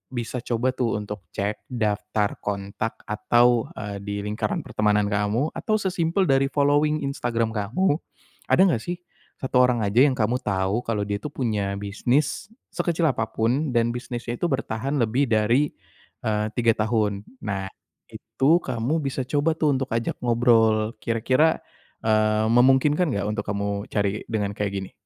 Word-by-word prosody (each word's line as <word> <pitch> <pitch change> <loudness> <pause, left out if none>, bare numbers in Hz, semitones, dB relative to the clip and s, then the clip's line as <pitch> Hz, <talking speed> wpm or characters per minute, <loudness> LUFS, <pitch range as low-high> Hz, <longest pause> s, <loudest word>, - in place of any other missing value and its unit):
bisa 120 +1 -3
coba 120 +2 0
tuh 125 -3 -1
untuk 105 -2 -7
cek 100 +2 -3
daftar 105 -3 -1
kontak 100 +2 -4
atau, 120 +2 +2
eee, 105 -1 -5
di 100 0 -4
lingkaran 110 - -2
pertemanan 105 -1 +1
kamu, 105 +8 0
atau 215 - 0
sesimpel 180 -1 0
dari 135 0 +3
following 145 +2 +2
Instagram 120 -5 -1
kamu, 125 - 0 0.5
ada - - +4
enggak 175 -12 +3
sih 175 0 -4 0.4
satu 130 -1 +1
orang 125 -3 +3
aja 105 +5 +4
yang 135 - 0
kamu 120 +1 0
tahu 100 -2 0
kalau 110 -3 0
dia 100 0 -2
tuh 105 - -5
punya 105 -6 -1
bisnis 110 - -1 0.2
sekecil 170 -2 0
apapun 120 +4 -1
dan 120 0 +3
bisnisnya 120 0 -5
itu 175 - +1
bertahan 135 -1 -2
lebih 125 +5 +1
dari, 115 +6 +2 0.5
eee, 105 -1 0
3 115 -2 +3 0.2
tahun. 105 -3 +1 0.2
Nah, 100 -2 -2 0.4
itu 155 +6 +1
kamu 130 +5 -1
bisa 135 -1 -2
coba 145 +3 +1
tuh 150 -4 +2
untuk 135 0 -3
ajak 115 0 -1
ngobrol, 115 -2 +3
kira-kira, 130 +7 +2 0.5
eee, 110 0 +3
memungkinkan 135 +7 +4
enggak 100 -3 -1
untuk 105 -1 -2
kamu 100 0 -2
cari 100 0 -1
dengan 105 -2 -1
kayak 105 -1 -2
gini? 95 - -8
115 Hz, 150 wpm, -24 LUFS, 105-135 Hz, 0.5 s, ada